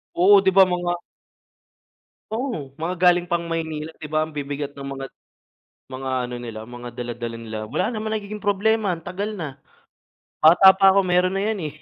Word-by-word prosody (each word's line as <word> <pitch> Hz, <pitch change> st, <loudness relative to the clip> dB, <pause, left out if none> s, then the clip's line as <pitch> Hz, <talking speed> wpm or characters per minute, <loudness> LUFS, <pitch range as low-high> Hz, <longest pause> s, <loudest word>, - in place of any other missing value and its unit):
Oo, 195 Hz, +3 st, +7 dB
'di 190 Hz, -, +4 dB
ba 195 Hz, -, +9 dB
mga 175 Hz, -1 st, -1 dB, 1.4 s
Oo 245 Hz, +5 st, -2 dB, 0.3 s
mga 180 Hz, +3 st, -2 dB
galing 175 Hz, 0 st, +4 dB
pang 170 Hz, -1 st, -1 dB
Maynila, 160 Hz, -1 st, -3 dB
'di 155 Hz, -, -7 dB
ba 155 Hz, +1 st, +1 dB
ang 155 Hz, -, -7 dB
bibigat 145 Hz, -1 st, -4 dB
ng 140 Hz, -1 st, -9 dB
mga, 135 Hz, 0 st, -5 dB, 0.9 s
mga 130 Hz, 0 st, -5 dB
ano 125 Hz, 0 st, -5 dB
nila 115 Hz, -3 st, -7 dB
mga 120 Hz, +1 st, -9 dB
dala-dala 120 Hz, -1 st, -5 dB
nila. 110 Hz, -1 st, -6 dB
Wala 210 Hz, -, -1 dB
naman 220 Hz, -1 st, -3 dB
nagiging 210 Hz, 0 st, -5 dB
problema 205 Hz, -1 st, +1 dB
ang 165 Hz, -, -13 dB
tagal 205 Hz, +4 st, -4 dB
na. 145 Hz, -7 st, -7 dB, 0.8 s
Bata 175 Hz, +5 st, +8 dB
pa 195 Hz, 0 st, +4 dB
ako 200 Hz, -, +4 dB
meron 180 Hz, +1 st, +2 dB
na 195 Hz, -, 0 dB
yan 210 Hz, -, -4 dB
eh. -, -, -7 dB
170 Hz, 180 wpm, -23 LUFS, 140-195 Hz, 1.4 s, ba